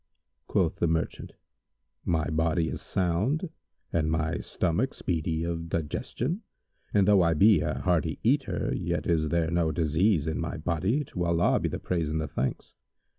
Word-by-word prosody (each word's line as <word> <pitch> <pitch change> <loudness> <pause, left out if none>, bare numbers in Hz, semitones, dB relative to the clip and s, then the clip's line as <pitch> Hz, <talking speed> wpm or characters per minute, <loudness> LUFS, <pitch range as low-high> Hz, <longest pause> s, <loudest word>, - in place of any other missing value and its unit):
Quoth - - +1
the 85 - +1
merchant, 80 0 -2 0.7
"My 80 -4 +1
body 80 +1 +1
is - - -5
sound 105 - 0 0.4
and 80 -2 +1
my 80 +1 0
stomach 95 +9 -1
speedy 80 -2 -1
of 85 0 -3
digestion, 115 - -2 0.5
and 100 -2 +3
though 100 -2 +6
I 85 -2 +3
be 105 +6 +6
a 75 -1 -1
hearty 85 -3 +1
eater, 135 +5 +1
yet - - -2
is 80 -3 +1
there 85 0 +1
no 85 -2 +2
disease 80 +2 +2
in 80 - -1
my 85 0 -3
body, 90 - 0
to 90 -9 -3
Allah 85 0 +3
be - - -1
the - - -3
praise 85 -4 -1
and 80 +1 -1
the 80 - -2
thanks!" 65 -1 -3
85 Hz, 165 wpm, -28 LUFS, 80-95 Hz, 0.7 s, though